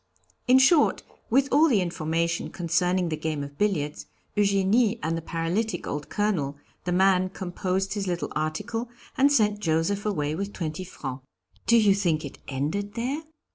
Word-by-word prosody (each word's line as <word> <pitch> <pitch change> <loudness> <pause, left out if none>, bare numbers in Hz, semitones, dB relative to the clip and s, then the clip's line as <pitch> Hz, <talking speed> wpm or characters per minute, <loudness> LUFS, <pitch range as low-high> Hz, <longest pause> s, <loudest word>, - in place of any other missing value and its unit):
In 255 +1 +7
short, 290 +4 +4 0.3
with 270 +4 +3
all 315 +2 +5
the 225 -7 +4
information 170 -1 -1
concerning 180 +1 0
the 155 - -1
game 155 -2 -3
of 140 0 -10
billiards, 155 -8 -1 0.3
Eugénie 205 +3 +3
and 165 +1 0
the 165 - -3
paralytic 175 +5 -2
old 145 0 -4
Colonel, 175 -10 -1 0.3
the 180 - -1
man 185 0 +3
composed 190 +1 -2
his 200 -2 -3
little 175 -1 -2
article, 210 +10 -2 0.3
and 280 +2 +4
sent 210 -6 +3
Joseph 170 +3 0
away 150 -8 -1
with 200 +5 -4
twenty 160 +2 -4
francs. 135 -7 -7 0.4
Do 235 - +6
you 210 -3 +5
think 170 -6 0
it 140 - -9
ended 155 +10 -2
there?" 260 +6 -2
185 Hz, 160 wpm, -26 LUFS, 160-210 Hz, 0.4 s, In